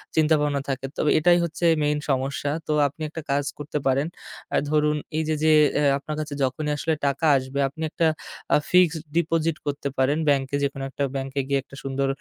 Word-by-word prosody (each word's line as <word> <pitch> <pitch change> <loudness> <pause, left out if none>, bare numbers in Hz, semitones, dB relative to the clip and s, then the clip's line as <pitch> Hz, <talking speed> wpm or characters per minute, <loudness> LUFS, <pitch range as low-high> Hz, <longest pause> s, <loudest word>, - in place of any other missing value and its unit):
চিন্তাভাবনা 150 -2 +2
থাকে। 135 0 -2
তবে 150 - +1
এটাই 175 +2 +5
হচ্ছে 170 +1 -2 0.2
মেইন 150 0 +1
সমস্যা। 135 +1 -1 0.2
তো, 155 - +1
আপনি 145 +3 -12
একটা 160 +1 -6
কাজ 140 +1 +1
করতে 150 0 -4
পারেন। 135 +3 +2 0.5
আ - - +2
ধরুন, 150 0 +2 0.2
এইযে, 160 0 0
যে 155 - +5 0.3
আ - - +2
আপনার 150 +2 -6
কাছে 150 -1 -4
যখনই 140 +4 -1
আসলে 160 +2 0
টাকা 140 +4 0
আসবে 130 +1 -4
আপনি 150 +4 -11
একটা 165 - +2 0.5
আ - - +7
ফিক্সড 175 -3 +4
ডিপোজিট 165 -1 +1
করতে 140 -1 -2
পারেন 135 +3 +2
ব্যাংকে। 135 -1 +1
যেকোনো 135 -1 -2
একটা 140 - -3
ব্যাংকে 135 +1 -3
গিয়ে 140 0 +1
একটা 135 - -14
সুন্দর, 135 0 -1
145 Hz, 185 wpm, -24 LUFS, 135-155 Hz, 0.5 s, আ